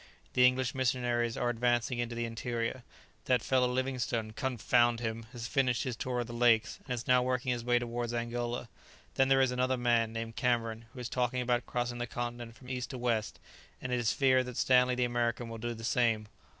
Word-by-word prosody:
The 125 0 +7
English 125 -1 0
missionaries 125 -3 0
are 120 0 +1
advancing 120 +1 0
into 120 0 -2
the 120 0 -1
interior. 115 +2 -3 0.4
That 125 -3 +2
fellow 130 -1 +3
Livingstone, 125 -3 -1
confound 120 -1 +2
him! 115 -1 -4
has 120 -2 -6
finished 125 -2 +1
his 125 -3 -3
tour 125 +1 -2
of - - -3
the 120 - -8
lakes, 120 -2 +3
and 125 - -2
is 120 - -6
now 125 -1 +4
working 125 0 0
his 120 -1 -2
way 120 0 +3
towards 120 0 -2
Angola; 120 0 -3 0.5
then 135 - +3
there 135 0 +4
is 130 -1 +3
another 130 +1 +1
man 120 -2 +2
named 115 0 -5
Cameron 115 -2 0
who 125 - -11
is 125 - -4
talking 125 0 -1
about 125 -1 0
crossing 120 0 -2
the 120 - -2
continent 120 -1 -5
from 125 - -15
east 125 -1 -4
to 130 - -6
west, 115 -3 -1 0.4
and 125 - -5
it 125 - +1
is 115 -2 +2
feared 130 -2 +3
that 125 - -7
Stanley 125 -1 +4
the 125 0 +1
American 120 -1 -1
will 115 0 -7
do 120 +1 -3
the 115 - -10
same. 115 -3 +1
120 Hz, 210 wpm, -31 LUFS, 115-125 Hz, 0.5 s, The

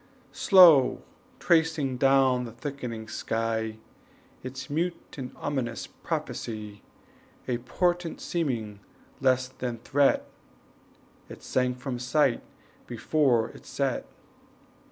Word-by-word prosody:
Slow 170 -9 +6 0.4
tracing 160 -6 +2
down 135 -1 +3
the 115 - -8
thickening 120 -3 -6
sky 110 0 -2 0.6
Its 130 +1 -7
mute 170 +3 -3
and 130 -3 -6
ominous 130 -5 -3
prophecy, 105 -3 -5 0.7
A 120 -2 -1
portent 175 +6 -1
seeming 120 - -2 0.4
less 130 -1 +2
than 125 -2 -5
threat, 140 +4 +2 1.0
It - - -11
sank 125 -1 0
from 125 -1 -4
sight 125 +1 +2 0.5
before 120 0 +1
it - - -14
set. - - -2
130 Hz, 95 wpm, -27 LUFS, 115-145 Hz, 1.0 s, Slow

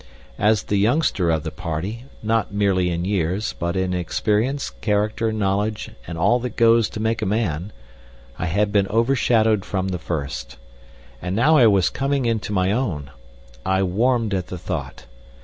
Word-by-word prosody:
As 105 -1 +3
the 100 - 0
youngster 105 - +2
of 80 -2 +1
the 80 - -4
party, 90 +11 -4 0.2
not 110 -1 0
merely 100 -3 +1
in 85 0 -2
years, 95 +1 -1
but 85 +1 -3
in 95 -1 0
experience, 105 +9 0
character, 105 +1 0
knowledge, 105 +1 -1 0.2
and 85 - -5
all 120 +9 +3
that 125 0 -5
goes 115 -1 +4
to - - -7
make 110 +1 0
a - - 0
man, 95 -3 -1 0.7
I 90 - -1
had 100 +4 +1
been 100 -2 +2
overshadowed 115 -3 +2
from 95 0 -2
the 90 -2 -3
first. 70 -7 -4 0.6
And 90 +1 -3
now 145 +9 +4
I 125 -6 +7
was 100 -4 +3
coming 135 0 0
into 115 -3 -1
my 95 -1 +1
own. 85 - -2 0.5
I 95 +3 +1
warmed 115 +3 +1
at 90 -2 -1
the 90 - -6
thought. 80 - -5
100 Hz, 165 wpm, -22 LUFS, 90-115 Hz, 0.7 s, I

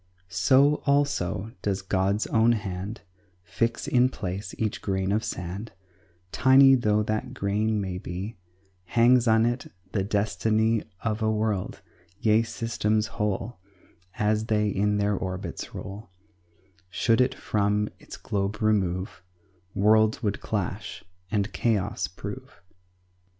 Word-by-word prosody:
So, 140 +10 +4
also, 140 -8 +1
does 100 -1 -1
God's 95 +2 0
own 115 +1 +3
hand 100 0 -4 0.4
Fix 115 +8 -2
in 125 0 +4
place 100 -4 -5
each 110 -2 -2
grain 95 -1 -1
of 110 +2 +1
sand, 95 +6 -5 0.6
Tiny 135 +1 +6
though 105 -4 +2
that 110 +5 -3
grain 105 +1 0
may 95 -2 -3
be 95 +6 -6 0.5
Hangs 120 +5 +4
on 110 0 +4
it 120 +1 -2 0.2
the 100 - 0
destiny 110 +2 +1 0.2
Of 110 0 -1
a 110 - +2
world, 105 -3 -2 0.4
yea, 110 +1 +4
systems 110 -2 -1 0.2
whole, 105 +1 -2 0.6
As 110 0 +1
they 105 -2 +2
in 105 +1 +1
their 100 0 +1
orbits 95 0 -5
roll; 100 +3 -8 0.8
Should 115 +5 +2
it 125 - +1
from 105 0 0
its - - -10
globe 100 +1 -2
remove, 95 -4 0 0.5
Worlds 110 +3 +3
would 105 -1 -1
clash 100 0 -4 0.3
and 105 -1 -1
chaos 110 -5 0
prove. - - -9
105 Hz, 125 wpm, -26 LUFS, 100-115 Hz, 0.8 s, Tiny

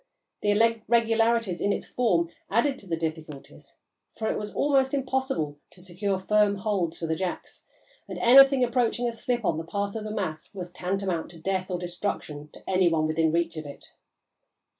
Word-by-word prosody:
The 205 - 0
irregularities 225 -1 +2
in 205 - +2
its - - -2
form 175 -9 +1 0.2
added 265 +6 +1
to 195 - -14
the 165 -2 -1
difficulties, 155 -3 -7 0.4
for 220 -1 -1
it - - -2
was 210 0 -5
almost 275 -1 +2
impossible 260 - -2
to 180 - -19
secure 190 +2 -2
firm 205 +1 +2
holds 190 -5 -1
for 165 - -4
the 160 - 0
jacks, 180 +2 -5 0.4
and - - -5
anything 270 +2 +7
approaching 245 0 +1
a - - 0
slip 240 -1 -2
on 160 -3 +1
the - - -4
part 200 +4 -3
of 220 - -4
the 215 - -5
mass 185 -4 -4
was 180 -2 -6
tantamount 185 -2 -2
to 165 - -13
death 185 +2 -2
or 180 - -1
destruction 175 -4 -4
to - - -16
any 185 -2 +3
one 160 -2 +1
within 160 0 +1
reach 170 0 0
of 155 -1 -6
it. 140 - -11
195 Hz, 180 wpm, -26 LUFS, 170-230 Hz, 0.4 s, anything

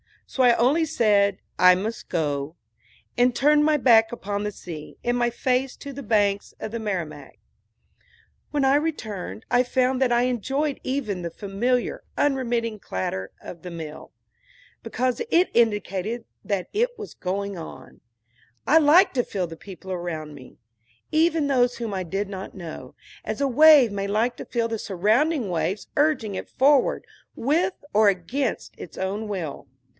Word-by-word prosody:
So 265 - -3
I 240 -1 +6
only 285 +8 +3
said 205 -8 +2 0.2
"I 180 0 +7
must 215 +5 -5
go," 145 -2 -2 0.6
and 245 0 +3
turned 295 +2 +4
my 310 0 +4
back 230 -4 +5
upon 205 -3 -4
the 210 - -2
sea, 160 -6 -9
and 240 0 +1
my 240 0 +2
face 255 +2 -1
to 280 - -9
the 280 - -7
banks 205 -4 +1
of 220 - -5
the 230 - -4
Merrimack. 190 -8 -5 1.1
When 290 -2 0
I 270 +1 +4
returned 225 - -3
I 245 0 +5
found 255 +1 +1
that 255 -2 +3
I 240 0 +3
enjoyed 270 +4 -1
even 250 -9 -2
the 170 - -3
familiar, 220 +7 -2
unremitting 240 -5 0
clatter 95 - -4
of 170 - -10
the 180 - -7
mill, 160 -3 -8 0.7
because 255 0 -1
it 350 +2 +3
indicated 215 0 0 0.2
that 195 -3 -2
something 470 +4 +2
was 425 - -8
going 200 +1 -3
on. 165 - -10 0.7
I 310 - +5
liked 320 +6 +5
to 245 - +2
feel 185 -6 -3
the 165 -1 -10
people 190 +1 -10
around 165 -4 -4
me, 130 -3 -14 0.5
even 320 -1 +2
those 250 -3 +2
whom 230 -3 -4
I 190 -1 -2
did 195 +4 -3
not 190 -1 -7
know, 160 -8 -9 0.3
as 215 - -3
a 280 - +2
wave 290 -3 +7
may 200 0 -3
like 225 +4 0
to - - -7
feel 230 -1 -1
the 225 -1 -3
surrounding 220 - +1
waves 175 +4 -2
urging 290 -9 +1
it - - -6
forward, 275 0 +3 0.3
with 340 +9 +1 0.2
or 215 0 +5
against 200 +9 -1
its - - -10
own 200 +3 -3
will. 175 -9 -5
225 Hz, 160 wpm, -24 LUFS, 190-265 Hz, 1.1 s, I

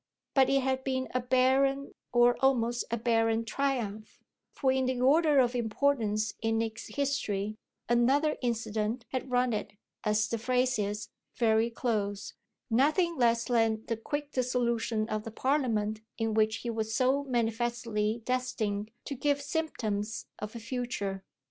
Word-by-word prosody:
But 265 -2 +5
it 275 0 +3
had 265 0 0
been 260 -1 -1
a 255 - +2
barren, 265 +2 +2 0.2
or 240 0 +5
almost 240 -3 +2
a 235 - -1
barren 225 0 +1
triumph, 225 -5 -2 0.3
for 265 -2 +1
in 260 -1 +1
the 255 -1 -1
order 295 +3 +4
of 250 -2 +4
importance 225 -3 0
in 225 0 +1
Nick's 225 0 -3
history 215 -7 -2 0.3
another 265 +6 +3
incident 230 -1 -1
had 260 0 -3
run 250 -1 +2
it, 210 - -3 0.3
as 215 0 +2
the 230 - -2
phrase 250 0 +1
is, 205 +1 -2 0.3
very 225 -1 +3
close: 210 -4 -2 0.4
nothing 310 +8 +3
less 235 -3 +3
than 225 -2 +1
the 230 - -1
quick 290 +6 -4
dissolution 235 -4 0
of 215 -1 -2
the 225 - -6
Parliament 220 -4 0 0.2
in 225 -1 0
which 220 0 +3
he 235 - 0
was 220 0 -2
so 265 +2 +2
manifestly 230 -2 -1
destined 230 -5 -1 0.2
to - - -4
give 285 +1 +1
symptoms 230 -9 -2
of 210 +2 -6
a - - -5
future. 225 -5 -3
235 Hz, 150 wpm, -30 LUFS, 220-260 Hz, 0.4 s, But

